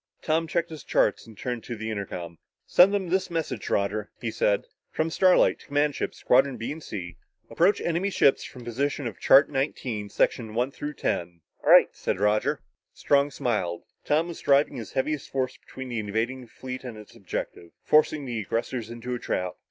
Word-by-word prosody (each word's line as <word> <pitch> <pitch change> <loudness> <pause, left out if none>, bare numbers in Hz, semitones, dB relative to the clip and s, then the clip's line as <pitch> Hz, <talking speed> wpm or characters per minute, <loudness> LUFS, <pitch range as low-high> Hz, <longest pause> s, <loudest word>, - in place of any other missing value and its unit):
Tom 165 +1 +1
checked 170 +1 -1
his 155 - -8
charts - - +1
and 110 -2 -14
turned 120 -3 -4
to 120 - -5
the 110 0 -4
intercom. 90 -5 -5 0.3
"Send 185 +3 +6
them 195 -3 -1
this 190 +2 +1
message, 165 -9 -3
Roger," 105 +1 0
he 115 - -3
said. 100 -2 +1 0.2
"From 160 +1 -1
Starlight, 185 +2 +4
to - - -17
command 145 +1 +1
ship, - - -3
Squadrons 130 0 +3
B 115 +4 -4
and 160 +2 -7
C 85 - -7 0.3
approach 190 +4 +3
enemy 170 +4 0
ships 140 -7 +3
from 125 - -10
position 140 +4 -2
of 115 -4 -5
chart 140 +2 +7
nineteen, 125 -6 -2
sections 110 +2 0
one 125 +3 +1
through 145 +1 -6
ten." 85 -6 -2 0.2
"Right!" - - +7
said - - -2
Roger. 105 +8 +1 0.3
Strong 140 0 +3
smiled. 95 -11 -2 0.2
Tom 155 +3 +2
was 170 - -7
driving 140 0 +3
his 115 - -7
heaviest 145 +2 -1
force 130 -1 -1
between 130 -1 -9
the 120 -2 -2
invading 115 +5 -2
fleet 130 +2 -7
and 120 -4 -7
its 105 +1 -13
objective 95 -4 -5
forcing 155 -1 +3
the 120 -3 -3
aggressors 115 +2 -3
into 120 +1 -5
a 120 - -3
trap. 90 -4 -2
125 Hz, 185 wpm, -26 LUFS, 110-150 Hz, 0.3 s, chart